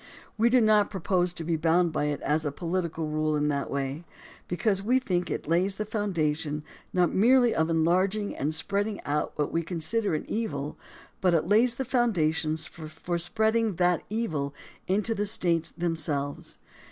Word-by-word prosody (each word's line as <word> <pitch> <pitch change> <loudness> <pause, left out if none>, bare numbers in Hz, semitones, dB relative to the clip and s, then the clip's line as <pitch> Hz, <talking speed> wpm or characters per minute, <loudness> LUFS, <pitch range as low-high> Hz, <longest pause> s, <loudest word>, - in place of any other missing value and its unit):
We 230 +2 +3
do 255 +1 +5
not 215 -2 +4
propose 180 -1 0
to 170 - -4
be 165 0 0
bound 165 +2 +2
by - - 0
it 145 -1 -2
as 155 +1 0
a 145 - -1
political 170 0 -2
rule 155 0 0
in 150 0 +1
that 140 -1 -1
way, 140 +3 -3 0.4
because 195 +2 0
we 240 +6 +2
think 180 -9 -1
it - - -4
lays 180 +4 +2
the 215 - -3
foundation 160 -8 -1 0.3
not 180 -2 +2
merely 245 +4 +5
of 160 +1 +1
enlarging 185 +6 +1
and 145 +3 -1
spreading 200 +6 -1
out 145 +1 -1
what 150 - -1
we 165 - 0
consider 170 +4 +1
an - - -3
evil, 150 -11 -3 0.5
but 180 -2 +3
it 160 - +1
lays 230 +4 +4
the 265 - -3
foundation 165 - +1
for 160 +2 -4
spreading 220 +3 +1
that 175 0 +2
evil 155 -11 -2 0.3
into 210 +4 +1
the 205 -1 -1
States 170 -5 +1
themselves. 155 -4 -3
175 Hz, 170 wpm, -27 LUFS, 155-210 Hz, 0.5 s, do